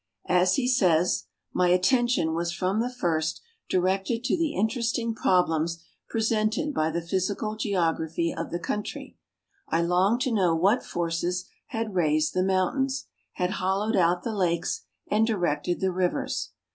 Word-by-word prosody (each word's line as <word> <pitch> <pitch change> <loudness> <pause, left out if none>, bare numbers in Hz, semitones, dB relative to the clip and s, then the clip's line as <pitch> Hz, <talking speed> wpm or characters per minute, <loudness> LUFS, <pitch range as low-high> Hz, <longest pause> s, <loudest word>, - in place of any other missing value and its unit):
As 180 +1 +4
he 255 -2 0
says: 180 -9 +3
" - - -57
My 180 - +3
attention 185 -1 +3
was 170 +1 -1
from 185 +4 -1
the 245 +2 0
first 165 -9 -1 0.3
directed 190 +5 0
to - - +1
the 330 -3 -1
interesting 230 +2 0
2)roblems 170 -6 +1 0.3
presented 225 +6 0
by 155 - +1
the'physical 190 +6 -2
geography 170 -5 0
of - - -4
the 170 - -2
country. 210 +4 -5 0.5
I 170 - +1
longed 185 +7 +2
to 255 - +1
know 180 -6 +3
what 195 +9 +3
forces 175 +2 -2 0.2
had 225 -2 -3
raised 155 -3 +2
the 185 - +1
mountains, 195 +9 0 0.3
had 180 0 -1
hollowed 195 +4 +1
out 175 -1 +2
the 230 - -2
lakes, 175 -4 -1 0.2
and 220 +1 +2
directed 175 -5 -1
the 190 -1 +1
rivers. 180 0 -1
185 Hz, 145 wpm, -26 LUFS, 170-220 Hz, 0.5 s, As